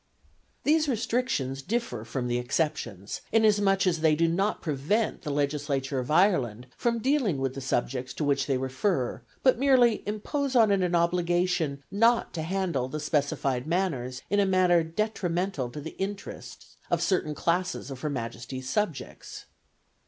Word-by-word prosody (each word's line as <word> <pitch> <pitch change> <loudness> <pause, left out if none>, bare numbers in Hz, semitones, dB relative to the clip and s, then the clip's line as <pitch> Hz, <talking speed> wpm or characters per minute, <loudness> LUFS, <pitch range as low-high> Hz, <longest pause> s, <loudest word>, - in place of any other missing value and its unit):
These 310 0 +3
restrictions 225 - -1
differ 190 - -2
from 125 +1 -3
the 120 0 0
exceptions, 120 - -2
inasmuch 205 -3 +3
as 175 -3 +1
they 155 -1 +4
do 165 +2 +2
not 195 +6 0
prevent 160 +9 -1
the - - -5
Legislature 140 -1 -1
of 125 - -4
Ireland 145 - +2
from 235 -1 0
dealing 245 - +1
with 135 -1 -1
the 135 - -6
subjects 125 0 -1
to - - -2
which 140 -1 +1
they 135 -2 +1
refer, 130 +2 -1 0.2
but 260 -3 +4
merely 255 -5 +4
impose 265 +6 -2
on 225 -4 +6
it 200 -1 +3
an 180 -1 +1
obligation 170 -4 +1
not 230 +4 +3
to 165 - -3
handle 170 -6 -1
the 155 - -4
specified 140 -3 -1
matters 150 -8 -1
in 205 - +1
a 200 - +4
manner 180 -2 +4
detrimental 175 - -2
to 130 - -7
the 160 +3 -8
interests 195 +1 -6
of - - +1
certain 155 -6 0
classes 170 -2 -1
of 130 - -7
Her 150 - -1
Majesty's 130 0 -5
subjects. 175 -1 -3
165 Hz, 155 wpm, -27 LUFS, 135-205 Hz, 0.2 s, on